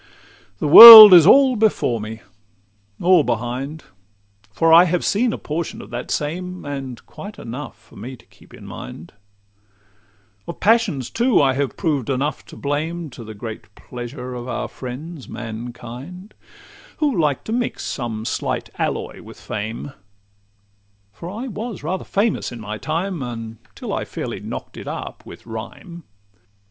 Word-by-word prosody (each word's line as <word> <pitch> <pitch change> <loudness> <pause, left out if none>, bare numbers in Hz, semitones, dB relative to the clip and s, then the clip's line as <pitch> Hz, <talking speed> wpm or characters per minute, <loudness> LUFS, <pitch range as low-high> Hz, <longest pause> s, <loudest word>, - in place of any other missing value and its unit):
The 150 - -3
world 220 +4 +13
is 170 -2 +8
all 265 +2 +5
before 210 - 0
me—or 105 - -3
behind; 125 +6 -4 0.7
For 165 +10 +2
I 170 +2 +8
have 180 0 -2
seen 230 +4 0
a - - -5
portion 160 +2 -5
of 100 - -12
that 120 +1 -6
same, 180 +5 -5
And 135 -4 -7
quite 205 +2 -11
enough 125 +2 -9
for 115 +2 -21
me 125 +6 -9
to 115 - -23
keep - - -23
in - - -14
mind;— 80 - -10 1.3
Of - - -8
passions, 205 - +1
too, 240 -1 +1
I 135 -2 +2
have 140 0 -3
proved 145 - -2
enough 135 +3 -3
to - - -13
blame, 155 +2 -4
To 120 - -11
the 110 -1 -11
great 110 +1 -10
pleasure 125 +1 -9
of 120 0 -8
our 125 - -4
friends, 135 +4 -9
mankind, 120 - -9 0.6
Who 295 -5 -1
like 150 -6 -1
to - - -8
mix 240 +1 -3
some 115 -4 -5
slight - - -4
alloy - - -4
with - - -14
fame; 110 +6 -7 1.2
For 170 - -9
I 220 +7 -7
was 225 - -7
rather 185 +5 -4
famous 205 - -2
in 120 - -9
my 105 0 -7
time, 170 +2 -4
Until 115 -3 -8
I - - -3
fairly - - -7
knock'd - - -9
it - - -10
up - - -8
with - - -13
rhyme. 155 - -10
140 Hz, 150 wpm, -20 LUFS, 120-180 Hz, 1.3 s, world